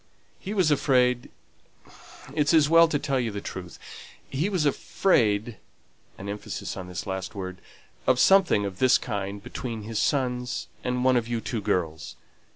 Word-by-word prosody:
He 205 Hz, +2 st, -5 dB
was 180 Hz, -6 st, +3 dB
afraid 125 Hz, -4 st, +2 dB, 1.0 s
it's 150 Hz, +2 st, +2 dB
as 155 Hz, -2 st, +5 dB
well 165 Hz, +1 st, +7 dB
to 160 Hz, -, 0 dB
tell 140 Hz, -2 st, -1 dB
you 120 Hz, -2 st, -1 dB
the 100 Hz, -1 st, -5 dB
truth 90 Hz, -4 st, -8 dB, 0.5 s
he 150 Hz, +9 st, -1 dB
was 180 Hz, -7 st, 0 dB
afraid" 115 Hz, -, +1 dB, 0.6 s
(an 100 Hz, -, -8 dB
emphasis 105 Hz, +1 st, -5 dB
on 95 Hz, -1 st, -7 dB
this 90 Hz, 0 st, -6 dB
last 95 Hz, +1 st, -5 dB
word) 95 Hz, -2 st, -6 dB, 0.5 s
"of 130 Hz, -1 st, +4 dB
something 185 Hz, -, +5 dB
of 95 Hz, -2 st, -6 dB
this 130 Hz, -1 st, +5 dB
kind 100 Hz, -3 st, -4 dB
between 120 Hz, -2 st, -5 dB
his 110 Hz, 0 st, -3 dB
sons 125 Hz, -3 st, -1 dB, 0.2 s
and 125 Hz, 0 st, -1 dB
one 130 Hz, -1 st, +4 dB
of 115 Hz, -1 st, -1 dB
you 120 Hz, -1 st, -1 dB
two 115 Hz, -1 st, -4 dB
girls. 80 Hz, -5 st, -2 dB
125 Hz, 160 wpm, -26 LUFS, 100-145 Hz, 1.0 s, well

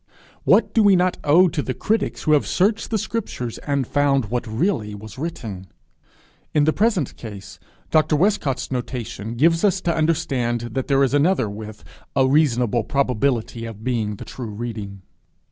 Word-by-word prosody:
What -, -, +4 dB
do 225 Hz, -, +4 dB
we 200 Hz, -2 st, +6 dB
not 180 Hz, 0 st, +1 dB
owe 170 Hz, +6 st, +6 dB
to 160 Hz, -3 st, -2 dB
the 130 Hz, -, -4 dB
critics 220 Hz, +1 st, -1 dB
who 155 Hz, -, +1 dB
have 150 Hz, -2 st, +3 dB
searched 210 Hz, +4 st, +1 dB
the 225 Hz, -, 0 dB
scriptures, 195 Hz, -, -4 dB
and 140 Hz, -2 st, -1 dB
found 135 Hz, -5 st, +1 dB
what 120 Hz, -1 st, -2 dB
really 110 Hz, -, -1 dB
was 110 Hz, +3 st, -10 dB
written! 110 Hz, -, -5 dB, 0.9 s
In 150 Hz, -, +4 dB
the 155 Hz, +1 st, +3 dB
present 205 Hz, -, +1 dB
case, 105 Hz, -4 st, -9 dB, 0.3 s
Dr. 155 Hz, 0 st, +3 dB
Westcott's 150 Hz, -7 st, 0 dB
notation 120 Hz, -3 st, -4 dB
gives 165 Hz, +6 st, +3 dB
us 195 Hz, -2 st, +3 dB
to 170 Hz, -2 st, 0 dB
understand 145 Hz, -7 st, 0 dB
that 130 Hz, +3 st, -3 dB
there 140 Hz, -1 st, +3 dB
is 135 Hz, -, +1 dB
another 145 Hz, -, +3 dB
with 105 Hz, +1 st, -8 dB, 0.3 s
'a 130 Hz, -1 st, +4 dB
reasonable 125 Hz, -5 st, +2 dB
probability 125 Hz, -3 st, 0 dB
of 110 Hz, -1 st, -9 dB
being 110 Hz, -4 st, -1 dB
the -, -, -9 dB
true 120 Hz, -4 st, -7 dB
reading.' 105 Hz, -3 st, -6 dB
135 Hz, 165 wpm, -22 LUFS, 115-160 Hz, 0.9 s, we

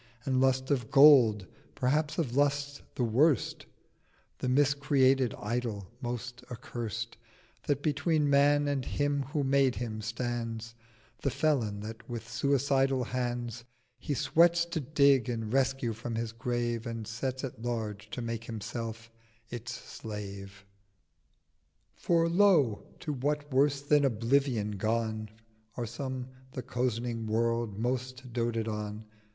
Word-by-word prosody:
And 130 Hz, -1 st, +2 dB
Lust 130 Hz, +1 st, +2 dB
of 125 Hz, -5 st, 0 dB
Gold—perhaps 135 Hz, -, +4 dB
of 135 Hz, -8 st, -1 dB
Lusts 145 Hz, 0 st, +1 dB
the 125 Hz, -, 0 dB
worst; 130 Hz, +5 st, +2 dB, 0.7 s
The 130 Hz, -, -1 dB
mis 140 Hz, +2 st, +4 dB
created 135 Hz, -3 st, +3 dB
Idol 105 Hz, -4 st, -3 dB
most 120 Hz, 0 st, -5 dB
accurst 115 Hz, -2 st, -5 dB, 0.5 s
That 145 Hz, -1 st, 0 dB
between 150 Hz, 0 st, +1 dB
Man 145 Hz, +1 st, +4 dB
and 140 Hz, -2 st, 0 dB
Him 145 Hz, +1 st, 0 dB
who 145 Hz, +2 st, -2 dB
made 135 Hz, -1 st, +3 dB
him 110 Hz, -3 st, -4 dB
stands: 115 Hz, 0 st, -3 dB, 0.5 s
The -, -, +1 dB
Felon 130 Hz, -7 st, 0 dB
that 110 Hz, +3 st, -8 dB
with 115 Hz, -2 st, -5 dB
suicidal 135 Hz, +2 st, +2 dB
hands 120 Hz, -1 st, -3 dB, 0.4 s
He 145 Hz, +1 st, -2 dB
sweats 170 Hz, +4 st, +4 dB
to -, -, 0 dB
dig 140 Hz, -3 st, +3 dB
and 115 Hz, -2 st, -3 dB
rescue 130 Hz, -3 st, +1 dB
from 115 Hz, +1 st, -5 dB
his 115 Hz, 0 st, -2 dB
Grave, 120 Hz, 0 st, -2 dB
And 115 Hz, -1 st, -4 dB
sets 130 Hz, +3 st, -3 dB
at 125 Hz, -4 st, -6 dB
large 110 Hz, -3 st, -3 dB
to 125 Hz, -, -5 dB
make 115 Hz, 0 st, -4 dB
Himself 115 Hz, +1 st, -6 dB, 0.4 s
its 120 Hz, 0 st, -5 dB
Slave. 100 Hz, -4 st, -8 dB, 1.3 s
'For 165 Hz, -1 st, +2 dB
lo, 170 Hz, -, +3 dB
to 150 Hz, -, -3 dB
what 145 Hz, +1 st, -2 dB
worse 140 Hz, +1 st, +3 dB
than 145 Hz, 0 st, +4 dB
oblivion 120 Hz, -2 st, +1 dB
gone 110 Hz, +1 st, -1 dB, 0.5 s
Are 120 Hz, -, -1 dB
some 130 Hz, +2 st, -5 dB, 0.2 s
the 130 Hz, -, -5 dB
cozening 120 Hz, -2 st, -2 dB
World 115 Hz, -1 st, 0 dB
most 130 Hz, +1 st, -3 dB
doted 115 Hz, -2 st, -1 dB
on. 105 Hz, 0 st, -4 dB
125 Hz, 130 wpm, -30 LUFS, 115-140 Hz, 1.3 s, Gold—perhaps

